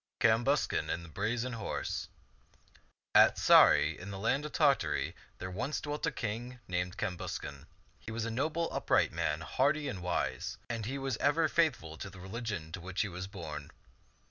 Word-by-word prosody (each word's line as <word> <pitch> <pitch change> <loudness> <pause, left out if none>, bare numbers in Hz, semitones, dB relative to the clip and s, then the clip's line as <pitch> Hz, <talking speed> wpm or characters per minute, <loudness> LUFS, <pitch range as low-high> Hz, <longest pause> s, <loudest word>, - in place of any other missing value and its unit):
CAMBUSCAN 115 - +2
AND 85 0 -2
THE - - -12
BRAZEN 115 +8 -1
HORSE 110 -3 -3 1.0
AT - - +7
Sarray, - - +6
in 95 - -7
the 100 - -5
land 135 +9 +1
of - - -11
Tartary, 80 - +2 0.2
there 95 0 -5
once 125 +10 -2
dwelt 150 +1 -2
a - - +1
king 120 +1 -4
named 90 0 -2
Cambuscan. 95 -4 -4 0.3
He - - -10
was 110 0 -2
a 115 - -2
noble, 155 +7 0
upright - - +2
man, 75 +2 -1
hardy 145 - +1
and 100 -9 -4
wise, 90 -1 -2
and 115 -2 -3
he 135 +3 -2
was 135 -1 -2
ever 155 +3 +3
faithful 130 - +1
to 95 - -6
the 95 -1 -12
religion 95 -4 -5
to 95 +2 -6
which 95 +2 -2
he 105 - -1
was 90 +1 -5
born. 75 -7 -7
110 Hz, 170 wpm, -32 LUFS, 90-135 Hz, 1.0 s, AT